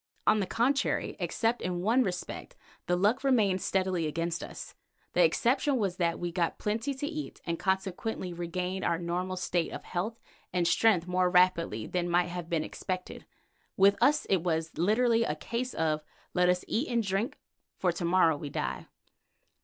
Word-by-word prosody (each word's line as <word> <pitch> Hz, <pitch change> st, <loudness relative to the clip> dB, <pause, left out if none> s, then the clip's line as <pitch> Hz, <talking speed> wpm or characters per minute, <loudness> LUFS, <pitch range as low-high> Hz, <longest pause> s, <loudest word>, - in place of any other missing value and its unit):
On 215 Hz, -, +4 dB
the 195 Hz, -, -1 dB
contrary, 265 Hz, +5 st, +1 dB
except 230 Hz, +1 st, 0 dB
in 175 Hz, -1 st, -2 dB
one 225 Hz, +7 st, +3 dB
respect, 180 Hz, -7 st, -4 dB, 0.3 s
the 175 Hz, -, +2 dB
luck 210 Hz, +9 st, +2 dB
remained 210 Hz, -9 st, +3 dB
steadily 185 Hz, -4 st, 0 dB
against 165 Hz, +2 st, -2 dB
us. -, -, -8 dB, 0.4 s
The -, -, +5 dB
exception 290 Hz, -, +2 dB
was 195 Hz, -5 st, -1 dB
that 170 Hz, -2 st, +1 dB
we 175 Hz, -1 st, -3 dB
got 170 Hz, -2 st, -1 dB
plenty 225 Hz, +7 st, -2 dB
to 270 Hz, -, -3 dB
eat 305 Hz, -1 st, -5 dB
and 170 Hz, -1 st, -2 dB
consequently 190 Hz, 0 st, -2 dB
regained 180 Hz, +2 st, -3 dB
our 170 Hz, -, +1 dB
normal 180 Hz, +2 st, -2 dB
state 175 Hz, -2 st, -1 dB
of -, -, -7 dB
health 215 Hz, +6 st, -3 dB, 0.3 s
and 180 Hz, -2 st, +1 dB
strength 185 Hz, -1 st, +3 dB
more 180 Hz, 0 st, +2 dB
rapidly 180 Hz, -, +3 dB
than 175 Hz, -1 st, -2 dB
might 175 Hz, +1 st, +2 dB
have 175 Hz, -1 st, -6 dB
been 165 Hz, -2 st, 0 dB
expected. 185 Hz, +2 st, -5 dB, 0.5 s
With 200 Hz, +1 st, +6 dB
us 290 Hz, +5 st, +4 dB
it 195 Hz, -, +3 dB
was 160 Hz, -2 st, -1 dB
literally 230 Hz, +6 st, +3 dB
a 150 Hz, -, -1 dB
case 235 Hz, +11 st, -4 dB
of 155 Hz, -1 st, 0 dB, 0.3 s
"Let 180 Hz, 0 st, +3 dB
us 180 Hz, 0 st, +1 dB
eat 255 Hz, +7 st, 0 dB
and 235 Hz, -1 st, +1 dB
drink, 200 Hz, +6 st, -1 dB, 0.4 s
for 180 Hz, -, +2 dB
to 170 Hz, -, -5 dB
morrow 170 Hz, -3 st, +4 dB
we 145 Hz, -, -6 dB
die." 65 Hz, -, -3 dB
185 Hz, 175 wpm, -29 LUFS, 170-220 Hz, 0.5 s, With